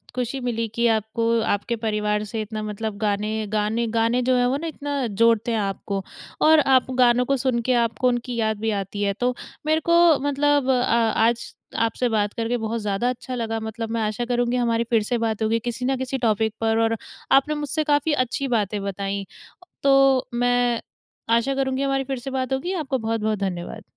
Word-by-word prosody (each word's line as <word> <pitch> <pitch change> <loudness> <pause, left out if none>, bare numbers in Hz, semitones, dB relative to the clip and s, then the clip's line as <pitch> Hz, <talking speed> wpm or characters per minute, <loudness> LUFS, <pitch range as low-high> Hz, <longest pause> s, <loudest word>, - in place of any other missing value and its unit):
खुशी 250 +2 -2
मिली 230 -2 -2
कि 235 0 +1
आपको, 230 +1 +1
आपके 205 +2 -1
परिवार 210 -1 0
से 225 - -2
इतना 215 0 -5
मतलब 215 0 -4
गाने-गाने-गाने 220 +3 0
जो 255 0 +2
हैं 245 - +3
वो 260 +3 +1
ना, 330 +2 -4
इतना 285 -3 -3 0.2
जोड़ते 230 0 +4
हैं 225 - +1
आपको। 195 0 -3 0.4
और 315 0 +6 0.2
आप 260 0 +2
गानों 245 0 +4
को 275 +1 +1
सुन 250 -1 0
के, 255 - +3
आपको 230 +3 -1
उनकी 245 0 -1
याद 220 -1 0
भी 220 0 0
आती 200 +2 -6
है। 200 - +1
तो 245 +5 0 0.3
मेरे 315 +1 +2
को 340 - +6 0.3
मतलब 285 -1 +2
अ, 255 -2 +3 0.4
आज 230 +1 +1 0.3
आपसे 235 +2 0
बात 210 -2 0
करके 230 +1 -1
बहुत 225 0 -3
ज़्यादा 210 +4 0
अच्छा 255 0 -5
लगा। 225 -1 -2
मतलब 220 +1 -5
मैं 230 -1 -1
आशा 215 +3 -1
करूँगी 245 0 0
हमारी 235 -1 +1
फिर 225 -3 +3
से 240 +3 -1
बात 225 -1 -2
होगी, 225 +1 +1
किसी 240 +2 -4
ना 265 0 +1
किसी 260 +1 -3
टॉपिक 220 0 +1
पर 225 0 +2
और 225 0 +1 0.3
आपने 275 +3 +4
मुझसे 295 +1 -1
काफ़ी 295 +1 +2
अच्छी 270 +3 -3
बातें 210 -4 0
बताईं। 200 0 -3 0.6
तो, 270 -1 +4
मैं 245 -1 +1 0.5
आशा 270 +4 +1
करूँगी 265 0 -1
हमारी 270 0 0
फिर 265 -1 -4
से 260 +3 -6
बात 260 0 -2
होगी, 345 +8 -2
आपको 295 -6 -1
बहुत-बहुत 220 -2 -1
धन्यवाद। 180 -3 -4
235 Hz, 190 wpm, -23 LUFS, 220-260 Hz, 0.6 s, और